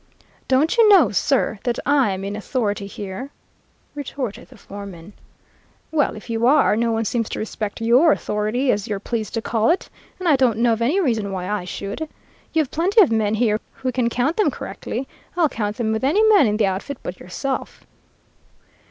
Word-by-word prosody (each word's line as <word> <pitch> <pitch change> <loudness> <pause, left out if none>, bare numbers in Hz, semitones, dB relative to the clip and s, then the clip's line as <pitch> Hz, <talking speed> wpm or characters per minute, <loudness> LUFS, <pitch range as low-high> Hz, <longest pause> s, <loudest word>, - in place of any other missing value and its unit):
"'Don't 290 - +2
you 445 -2 +7
know, 390 -5 +6
sir, 225 0 +1
that 240 -1 -1
I'm 245 -10 +2
in 200 +1 -4
authority 210 -2 -2
here?' 200 +6 -7 0.6
retorted 270 -6 -5
the - - -15
foreman. 200 -2 -10 0.8
"'Well, 305 -3 +1
if 215 - -11
you 230 0 +1
are, 280 -5 +4
no 230 +1 +1
one 225 0 0
seems 230 +1 -1
to - - -4
respect 215 -1 -4
your 250 +8 +5
authority, 220 +3 0
as 205 -1 -2
you're 205 -2 -2
pleased 220 +1 -4
to 225 - -2
call 225 +2 +1
it, 345 - 0 0.3
and 370 - -4
I 300 -4 +5
don't 250 -5 +2
know 235 0 +3
of 225 - -3
any 285 +12 +2
reason 225 - 0
why 185 -1 -4
I 205 -2 -2
should. 205 - -5 0.4
You 320 - +3
have 270 - -11
plenty 370 +7 +2
of 360 - +6
men 220 -1 +1
here 215 -2 +1
who 255 - -3
can 245 -1 0
count 250 +7 0
them 425 - +3
correctly. 265 - -5 0.3
I'll 330 -4 +3
count 210 -3 -3
them 225 -3 0
with 220 +3 -2
any 335 +11 +3
man 400 - +6
in 210 0 0
the 215 - +3
outfit 195 +8 -3
but 180 - -6
yourself.' 260 +10 -5
230 Hz, 195 wpm, -21 LUFS, 210-275 Hz, 0.8 s, you